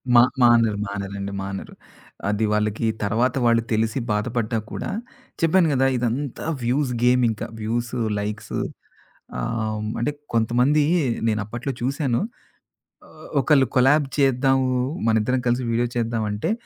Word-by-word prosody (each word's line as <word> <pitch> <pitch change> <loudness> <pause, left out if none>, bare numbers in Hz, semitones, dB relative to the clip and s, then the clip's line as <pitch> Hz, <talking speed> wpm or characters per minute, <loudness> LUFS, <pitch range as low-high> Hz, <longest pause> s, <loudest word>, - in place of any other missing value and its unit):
మా 120 - +9 0.2
మానరు 115 -3 +5
మానరండి 100 0 -5
మానరు. 95 0 -6 0.6
అది 105 +1 0
వాళ్ళకి 105 +1 0 0.2
తర్వాత 115 +5 +1
వాళ్ళు 115 -1 +4
తెలిసి 110 +3 +1
బాధపడ్డా 115 +1 -1
కూడా - - -4 0.5
చెప్పాను 165 +1 +4
గదా! 135 0 +3
ఇదంతా 125 +4 -2 0.2
వ్యూస్ 130 +3 +1
గేమ్ 125 0 +4
ఇంకా 110 - -3
వ్యూస్ 115 +2 -2 0.3
లైక్స్ 105 +1 -5 0.9
ఆహ్, 110 - -2 0.2
అంటే 145 +5 0 0.2
కొంతమంది 125 +6 +3 0.4
నేను 110 -1 +1
అప్పట్లో 120 +5 -4
చూశాను. 130 -1 0 0.9
ఆహ్, - - -14
ఒకళ్ళు 135 -3 +4
కొలాబ్ 135 +3 +5
చేద్దాము. 135 -1 +3 0.4
మనిద్దరం 115 +3 +2
కలిసి 120 +2 +1
వీడియో 120 +1 +1
చేద్దామంటే 110 - -1
120 Hz, 120 wpm, -23 LUFS, 110-130 Hz, 0.9 s, మా